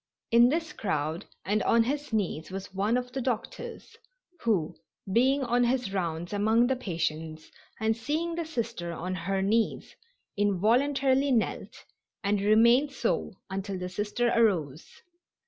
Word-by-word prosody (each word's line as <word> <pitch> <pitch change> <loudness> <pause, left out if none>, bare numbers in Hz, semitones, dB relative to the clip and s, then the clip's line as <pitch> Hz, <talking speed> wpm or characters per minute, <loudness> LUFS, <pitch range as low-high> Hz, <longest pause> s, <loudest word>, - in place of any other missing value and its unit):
In 235 +1 +7
this 320 +3 -1
crowd 160 -2 -2 0.2
and 210 +2 +1
on 230 0 +4
his 285 +3 -3
knees 180 -7 -1
was 190 0 -7
one 205 +5 +1
of 250 0 -4
the 265 +1 -3
doctors, 255 - -4 0.4
who, 195 - 0 0.4
being 265 +4 +3
on 245 0 +2
his 240 -4 0
rounds 175 -1 -2
among 220 +4 +3
the 265 +2 +1
patients 160 -7 -4 0.3
and 220 +1 +1
seeing 305 +9 -2
the 335 0 -2
Sister 230 - -4
on 180 +3 -4
her 190 +2 -1
knees, 220 +3 0 0.4
involuntarily 260 +8 +2
knelt, 230 -4 -1 0.4
and 200 0 +1
remained 235 +7 +5
so 235 -4 -1 0.2
until 195 0 -3
the 180 0 -4
Sister 210 +5 -1
arose. 170 - +1
220 Hz, 140 wpm, -28 LUFS, 190-250 Hz, 0.4 s, In